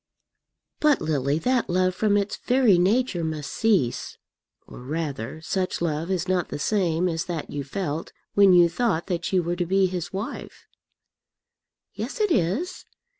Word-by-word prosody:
"But, 300 -2 +4
Lily, 145 -2 0
that 250 +7 0
love, 185 +1 +2
from 205 +1 +2
its 200 0 -1
very 245 -8 +3
nature, 195 -1 +1
must 155 -3 -4
cease; 195 - 0 0.5
or, - - -12
rather, 140 0 -4
such 185 +3 -2
love 165 0 -2
is 185 -1 -1
not 180 -2 0
the - - -4
same 175 0 +1
as 165 -1 -2
that 170 -4 -5
you 145 -1 -3
felt 155 +1 -4 0.2
when 200 -1 +6
you 175 -1 +7
thought 170 -1 0
that 175 -3 -3
you 185 -2 +2
were 175 +1 -1
to 175 0 -1
be 190 +1 +3
his 180 -2 -3
wife." 200 +4 -6 1.3
"Yes, - - -5
it 420 -3 +2
is. 250 - 0
180 Hz, 160 wpm, -25 LUFS, 160-200 Hz, 1.3 s, you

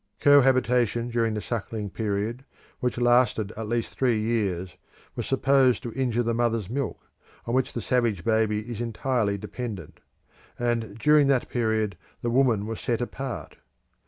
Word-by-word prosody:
Cohabitation 125 -4 +4
during 115 -2 0
the 105 - -2
suckling 110 -3 -4
period, 110 +4 -2 0.4
which 125 -1 -1
lasted 120 -3 +2
at 110 -1 -5
least 115 0 -2
three 125 -4 +2
years, 100 -6 -1 0.4
was - - -4
supposed 135 -1 +3
to 120 -3 -5
injure 120 -2 0
the 115 0 0
mother's 115 -3 0
milk, 140 +1 -3 0.4
on 115 - -3
which 130 0 +1
the 120 - -3
savage 115 -6 0
baby 110 -1 +1
is 115 0 -6
entirely 115 -3 0
dependent; 115 0 -7 0.6
and 115 -3 -1
during 150 +3 +5
that 135 -3 +1
period 110 -6 0 0.2
the 120 - 0
woman 120 -5 +3
was 110 0 -5
set 120 -2 -1
apart. 125 +1 -5
115 Hz, 150 wpm, -26 LUFS, 110-125 Hz, 0.6 s, during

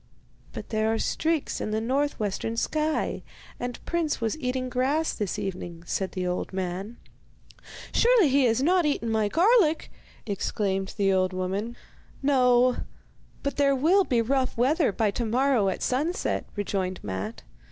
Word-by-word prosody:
'But - - -8
there 220 0 +1
are 225 - +1
streaks 320 +5 -1
in - - -2
the 215 +1 0
north 275 +6 0
western 215 +2 -2
sky, 310 +5 -1 0.4
and 245 0 -4
Prince 335 -3 -1
was 225 -2 -1
eating 255 -1 -2
grass 270 +6 0
this 205 -2 -3
evening,' 175 -4 -5
said 190 +2 -2
the 185 -1 -2
old 180 0 -2
man. 190 +4 -4 1.0
'Surely 470 -7 +5
he 270 0 +4
has 235 +2 +2
not 360 +3 +4
eaten 285 -7 0
my 220 -1 +2
garlic,' 340 - +3 0.3
exclaimed 195 -1 -2
the 195 -2 +3
old 185 0 +1
woman. 195 +6 -3 0.5
'No; 250 -2 +4 0.7
but 280 - -2
there 280 -1 +3
will 340 +9 +4
be 240 -8 +1
rough 260 +1 0
weather 275 - +3
by 210 +1 +1
to 235 - -2
morrow 245 -3 +2
at 190 - -3
sunset,' 300 +8 -1
rejoined 190 -2 -2
Matte. 100 +3 -5
240 Hz, 150 wpm, -26 LUFS, 200-285 Hz, 1.0 s, Surely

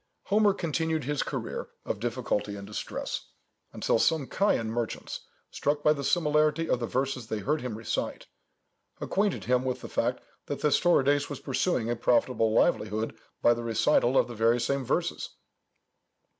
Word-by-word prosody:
Homer 205 -1 +3
continued 160 -2 -1
his 145 +2 -1
career - - -4 0.2
of 105 - -3
difficulty 115 -3 -2
and 100 -1 -8
distress, 105 +1 -5 0.4
until - - +1
some 155 -1 +2
Chian 115 - +1
merchants, 115 -1 -3 0.3
struck 145 0 -1
by 150 - +5
the 140 -2 -5
similarity 155 +1 +2
of 125 - +1
the 120 - -2
verses 130 -2 -2
they 110 - -2
heard 150 +9 -1
him 125 -4 -4
recite, 110 - -3 0.7
acquainted 200 -1 0
him 125 0 +2
with 130 -1 -2
the - - -6
fact - - -1 0.2
that - - -3
Thestorides 145 -2 +3
was 145 - -5
pursuing 135 -3 0
a 120 - 0
profitable 120 -1 +2
livelihood 110 0 +1 0.3
by 120 - +6
the 120 - -4
recital 120 +2 +2
of - - +4
the 120 - -7
very 115 +2 +3
same 140 0 -1
poems. - - -1
130 Hz, 155 wpm, -28 LUFS, 115-150 Hz, 0.7 s, by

